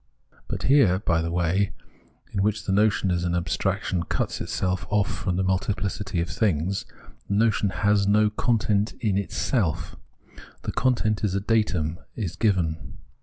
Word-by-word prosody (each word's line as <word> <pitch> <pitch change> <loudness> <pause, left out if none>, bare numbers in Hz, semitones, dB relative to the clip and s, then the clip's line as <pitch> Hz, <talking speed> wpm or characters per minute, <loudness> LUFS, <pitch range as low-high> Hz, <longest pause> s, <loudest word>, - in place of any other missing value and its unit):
But - - -4
here, 130 -10 +5
by 85 -4 +1
the 85 - -2
way 90 +3 +1 0.6
in 100 - -1
which 105 +2 0
the - - -1
notion 100 -1 +2
as 85 -1 0
an 90 0 0
abstraction 85 +1 -1
cuts 85 - -2
itself 90 -1 -2
off 105 -1 +2
from 90 -3 -2
the 95 - 0
multiplicity 95 0 -1
of 85 - -2
things, 95 0 0 0.4
the 100 - 0
notion 105 -1 +2
has 100 0 +2
no 105 +1 +4
content 105 -2 +1
in 110 -6 0
itself; 95 - -1 0.7
the - - -2
content 115 -4 +1
is 100 -3 0
a - - +2
datum, 95 -6 0 0.2
is 95 -7 -3
given. 90 -2 0
100 Hz, 155 wpm, -25 LUFS, 90-105 Hz, 0.7 s, here